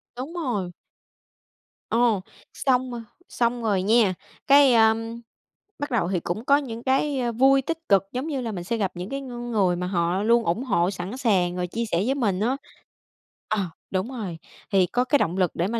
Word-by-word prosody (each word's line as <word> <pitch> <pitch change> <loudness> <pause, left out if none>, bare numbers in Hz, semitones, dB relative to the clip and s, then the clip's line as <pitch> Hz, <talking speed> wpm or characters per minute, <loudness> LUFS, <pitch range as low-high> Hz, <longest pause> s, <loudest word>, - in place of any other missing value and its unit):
Đúng 270 +7 -6
rồi. 235 - -2 1.2
Ồ, 230 -4 +2 0.3
xong 255 -1 +1
rồi 235 -1 -5 0.3
xong 235 0 0
rồi 200 -4 +1
nha, 215 -2 +4 0.3
cái, 280 -2 +7
a, 220 -1 +6 0.9
bắt 290 -1 -4
đầu 185 -7 +1
thì 185 -3 0
cũng 215 +9 -4
có 280 +1 +5
những 235 -5 -5
cái, 270 +1 +1
a, 240 -1 0
vui, 270 +3 +4
tích 325 +4 -3
cực, 195 -1 +5
giống 255 +5 -3
như 275 -4 -2
là 230 -2 -3
mình 175 -3 -5
sẽ 230 +6 -2
gặp 195 -3 -1
những 180 +3 -6
cái 275 0 -4
ng 240 -2 -6
người 190 -5 +2
mà 180 +1 -3
họ 180 +1 0
luôn 235 +1 +4
ủng 195 +10 0
hộ, 195 -6 +1
sẵn 190 +6 -6
sàng, 185 -8 +1
rồi 180 0 -2
chia 230 +5 -3
sẻ 180 -3 0
với 270 +2 +1
mình 205 -9 0
á. 245 +6 0 0.9
Ờ, 200 -5 0 0.2
đúng 190 +5 -1
rồi, 205 -10 -5 0.3
thì 190 -2 +4
có 245 +7 0
cái 285 - +3
động 175 +3 0
lực 180 -3 +2
để 175 +3 0
mà 230 +1 -2
225 Hz, 205 wpm, -24 LUFS, 185-255 Hz, 1.2 s, cái